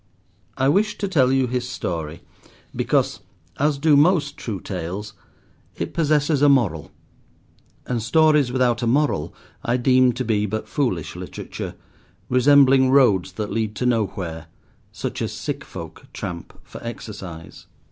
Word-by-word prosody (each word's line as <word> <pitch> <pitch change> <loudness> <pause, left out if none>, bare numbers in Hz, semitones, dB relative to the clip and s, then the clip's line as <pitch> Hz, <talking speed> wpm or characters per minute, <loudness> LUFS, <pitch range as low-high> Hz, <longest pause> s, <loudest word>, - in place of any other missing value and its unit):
I 135 0 +2
wish 205 +8 +2
to 200 - -2
tell 135 -9 +3
you 135 -1 +3
his 125 0 -3
story, 85 -8 -4 0.5
because, - - +1 0.4
as 145 0 +2
do 150 +1 +4
most 150 -1 +3
true 105 -5 -5
tales, 95 +4 -5 0.6
it - - -4
possesses 150 -2 +2
a 145 - +6
moral, 105 - +2 1.0
and 120 -2 -2
stories 150 +1 +3
without 125 -2 +1
a 120 - 0
moral 135 - +1 0.3
I 120 +1 +1
deem 130 0 +4
to 130 +2 -3
be 105 -2 +1
but 110 +2 -4
foolish 120 - -2
literature, - - -7 0.5
resembling 135 0 +5
roads 105 -9 +4
that 105 +1 -4
lead 110 -2 -2
to 125 - -2
nowhere, 95 -8 -1 0.4
such - - -5
as - - -2
sick - - -4
folk - - -10
tramp 85 -1 -7
for - - -11
exercise. 95 -8 -8
125 Hz, 140 wpm, -22 LUFS, 105-140 Hz, 1.0 s, a